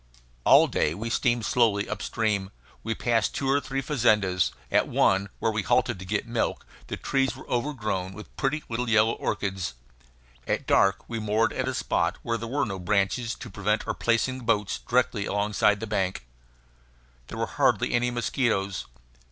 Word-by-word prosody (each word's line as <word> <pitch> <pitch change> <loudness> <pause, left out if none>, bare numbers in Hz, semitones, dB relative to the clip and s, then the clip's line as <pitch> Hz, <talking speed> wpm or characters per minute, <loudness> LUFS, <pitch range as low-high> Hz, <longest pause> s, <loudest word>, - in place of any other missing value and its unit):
All - - +8
day 75 - 0
we 115 +4 -4
steamed 120 -2 +1
slowly 110 -5 +2
up 105 -1 -4
stream. 105 -4 -1 0.3
We 115 0 -2
passed 115 -2 +1
two 135 - -2
or 140 +1 +3
three 135 0 -3
fazendas. 105 - +2 0.2
At - - +3
one, 95 +1 +2
where 110 - 0
we 110 0 -1
halted 95 - +1
to 95 - -8
get 100 +3 -1
milk, 115 -1 -2 0.2
the - - -4
trees 135 -1 0
were - - -12
overgrown 115 -8 -2
with 105 +2 -12
pretty 145 +2 -1
little 120 +1 -2
yellow 110 0 +4
orchids. 95 -8 -3 0.7
At - - -1
dark 100 0 +3
we 115 -1 -4
moored 110 +1 +1
at - - -2
a - - -1
spot - - 0
where 115 -1 -1
there 115 - -5
were 140 +5 0
no 95 -3 -5
branches 100 +5 0
to 120 - -9
prevent 105 +3 0
our - - 0
placing 120 +3 0
the - - -11
boats 105 -4 0
directly 120 -4 0
alongside 105 0 +2
the 115 - -4
bank. 95 - -2 1.0
There - - -7
were - - 0
hardly - - +1
any 120 +1 +2
mosquitoes. 115 -4 -1
110 Hz, 175 wpm, -26 LUFS, 100-120 Hz, 1.0 s, All